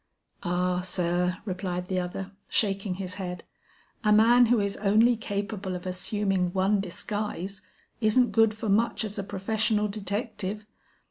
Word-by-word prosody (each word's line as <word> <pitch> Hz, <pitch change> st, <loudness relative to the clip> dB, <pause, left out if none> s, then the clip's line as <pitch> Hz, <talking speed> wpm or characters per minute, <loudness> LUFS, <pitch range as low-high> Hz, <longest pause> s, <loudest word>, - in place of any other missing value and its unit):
"Ah, 180 Hz, 0 st, 0 dB
sir," 180 Hz, 0 st, 0 dB
replied 180 Hz, -2 st, -3 dB
the 185 Hz, -1 st, 0 dB
other, 180 Hz, +2 st, -4 dB, 0.2 s
shaking 195 Hz, -2 st, 0 dB
his 185 Hz, -1 st, -5 dB
head, 180 Hz, -1 st, -5 dB, 0.6 s
"a 210 Hz, -, +3 dB
man 235 Hz, +3 st, +6 dB
who 240 Hz, 0 st, +4 dB
is 200 Hz, -1 st, 0 dB
only 215 Hz, +4 st, +4 dB
capable 205 Hz, -3 st, -3 dB
of 180 Hz, +1 st, -7 dB
assuming 185 Hz, 0 st, 0 dB
one 195 Hz, +2 st, +2 dB
disguise, 200 Hz, 0 st, -4 dB, 0.4 s
isn't 240 Hz, +3 st, +3 dB
good 225 Hz, -1 st, +4 dB
for 220 Hz, +1 st, -5 dB
much 220 Hz, +3 st, +2 dB
as 210 Hz, -2 st, -5 dB
a -, -, -2 dB
professional 210 Hz, +2 st, 0 dB
detective. 210 Hz, 0 st, -3 dB
200 Hz, 140 wpm, -27 LUFS, 185-215 Hz, 0.6 s, man